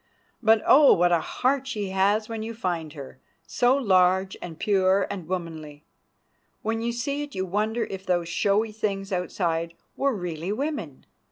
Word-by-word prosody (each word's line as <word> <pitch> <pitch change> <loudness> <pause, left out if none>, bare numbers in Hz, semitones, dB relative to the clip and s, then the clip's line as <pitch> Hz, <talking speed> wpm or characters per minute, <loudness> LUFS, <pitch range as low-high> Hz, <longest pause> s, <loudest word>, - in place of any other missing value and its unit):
But, 220 -1 +4
oh! 285 0 +7
what 175 +1 +3
a 170 - +4
heart 270 - -1
she 210 -7 -3
has 200 +3 +1
when 225 -1 -5
you 225 +1 -5
find 175 -8 -3
her—so 150 - -2
large 190 -5 +3
and 165 -3 -7
pure 195 -1 +2
and 185 -5 -6
womanly. 160 -5 -6 0.8
When 225 +1 -1
you 235 +1 -1
see 280 +5 -2
it 290 -1 -7
you 190 0 -1
wonder 215 +5 -1
if 190 0 -7
those 175 -2 +1
showy 205 +5 +1
things 200 -2 -3
outside 170 -2 -2 0.2
were 275 -3 0
really 175 -1 -4
women. 220 - -4
195 Hz, 160 wpm, -25 LUFS, 175-225 Hz, 0.8 s, oh